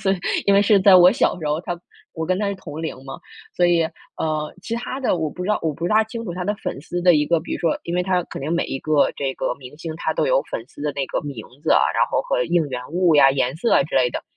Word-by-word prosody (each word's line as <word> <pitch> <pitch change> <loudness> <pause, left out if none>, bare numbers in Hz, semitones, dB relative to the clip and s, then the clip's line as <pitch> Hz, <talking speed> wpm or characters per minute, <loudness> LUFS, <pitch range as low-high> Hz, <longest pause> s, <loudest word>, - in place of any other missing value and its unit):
所 195 - +1
以 195 - +2 0.3
因 200 - +5
为 200 - +5
是 205 -1 +4
在 190 -1 +7
我 180 +2 +7
小 235 - +1
时 155 - -5
候， 150 +2 0
她 175 -1 -5 0.4
我 160 -1 -3
跟 185 +2 0
她 205 -1 0
是 200 - -2
同 160 -5 -8
龄 160 -5 -4
嘛。 135 +5 -8 0.3
所 175 - +3
以， 170 -1 +3 0.3
呃， 155 -1 -2
其 230 - -4
它 255 +3 -4
的 250 -9 0
我 160 -1 -1
不 180 - -7
知 185 - -4
道 210 - +2
我 155 -3 -2
不 170 +3 -3
大 215 +4 +4
清 230 +1 -7
楚 175 - -4
她 180 +1 -4
的 205 +3 -1
粉 200 - -6
丝 175 +4 -4
的 180 -1 +6
一 150 -1 +2
个 170 0 +2
比 160 - -7
如 - - -2
说， 165 - 0
因 170 - -4
为 180 - +1
他 180 -1 +1
肯 - - -8
定 140 +3 -4
每 170 - +1
一 135 - -4
个 155 0 +2
这 135 -1 -2
个 - - -2
明 130 +1 -12
星， 160 0 -6
他 160 -1 -2
都 - - +1
有 - - +3
粉 115 - -4
丝 145 - -16
的 150 0 -1
那 140 -1 -1
个 - - -1
名 140 -7 -7 0.2
字 - - +2
啊， - - +5
然 - - +3
后 - - 0
和 - - 0
应 170 -3 +1
援 125 -1 -4
物 175 -1 +3
呀、 135 -2 +7
颜 135 -1 0
色 230 +8 +1
啊 - - +5
之 165 - -7
类 125 - +4
的。 - - -5
170 Hz, 330 characters per minute, -21 LUFS, 150-190 Hz, 0.4 s, 在